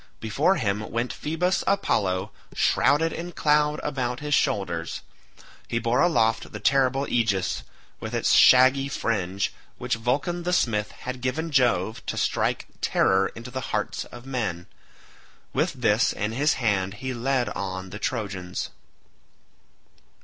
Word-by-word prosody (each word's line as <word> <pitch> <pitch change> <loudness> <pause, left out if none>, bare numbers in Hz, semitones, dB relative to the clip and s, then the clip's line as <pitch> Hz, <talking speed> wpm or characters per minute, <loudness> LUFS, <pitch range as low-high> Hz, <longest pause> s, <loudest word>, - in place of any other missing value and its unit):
Before 140 - +2
him 105 - -1
went 120 +2 -2
Phoebus 180 +5 -1
Apollo 100 - +1 0.2
shrouded 155 +4 +3
in 175 +1 -6
cloud 150 0 +2
about 125 -3 -2
his 150 0 -3
shoulders. - - 0 0.7
He 115 - -1
bore 115 +2 +1
aloft 115 -10 +2
the - - -6
terrible 135 0 +2
aegis 105 -6 0 0.4
with - - -5
its - - +2
shaggy 130 +2 +6
fringe, 100 -7 -1 0.2
which - - -2
Vulcan 135 +10 -1
the 180 +1 -1
smith 105 -10 +1
had 125 0 -7
given 160 +6 -2
Jove 115 -6 +2
to - - -3
strike - - 0 0.2
terror 95 0 +3
into 115 +2 -9
the 130 +1 -4
hearts - - -2
of 120 +1 -12
men. 110 -10 -3 0.9
With - - +1
this - - +2
in 105 +1 -2
his 145 +7 +2
hand 100 -5 0
he 130 +2 -4
led 125 +1 0
on 95 -1 -5
the 105 - -7
Trojans. 95 -7 -3
120 Hz, 135 wpm, -25 LUFS, 105-140 Hz, 0.9 s, shaggy